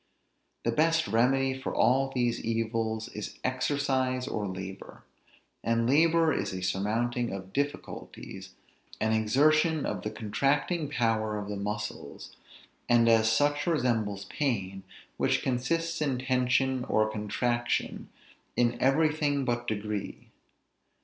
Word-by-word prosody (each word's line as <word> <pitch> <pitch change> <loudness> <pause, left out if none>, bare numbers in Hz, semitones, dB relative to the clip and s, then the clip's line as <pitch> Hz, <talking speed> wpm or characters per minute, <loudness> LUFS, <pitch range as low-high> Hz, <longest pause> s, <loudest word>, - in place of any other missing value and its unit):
The 115 - +1
best 165 +5 +2
remedy 130 +3 +2
for 130 0 -5
all 135 +2 +3
these 120 -3 -1
evils 115 -1 -1
is 105 - -7
exercise 130 -1 0
or 105 -5 -2
labor; 95 +1 -8 0.6
and 115 0 +1
labor 160 +3 +4
is - - -2
a 95 -1 -5
surmounting 115 +6 0
of 95 0 -7
difficulties, 145 +1 -5 0.4
an 110 0 +1
exertion 150 +8 +3
of - - -3
the 105 - -3
contracting 140 - 0
power 110 -5 0
of 105 -1 -5
the 105 - -3
muscles; 105 +1 -5 0.5
and 120 -1 +5
as 110 -1 +5
such 145 +6 +1
resembles 115 - 0
pain, 100 -9 -2 0.4
which - - +1
consists 165 +6 -1
in 140 -4 +1
tension 130 0 +1
or 110 0 +2
contraction, 120 +3 -2 0.5
in 120 0 +1
everything 145 0 +2
but 120 -1 -1
degree. 105 -1 -4
120 Hz, 120 wpm, -29 LUFS, 110-140 Hz, 0.6 s, and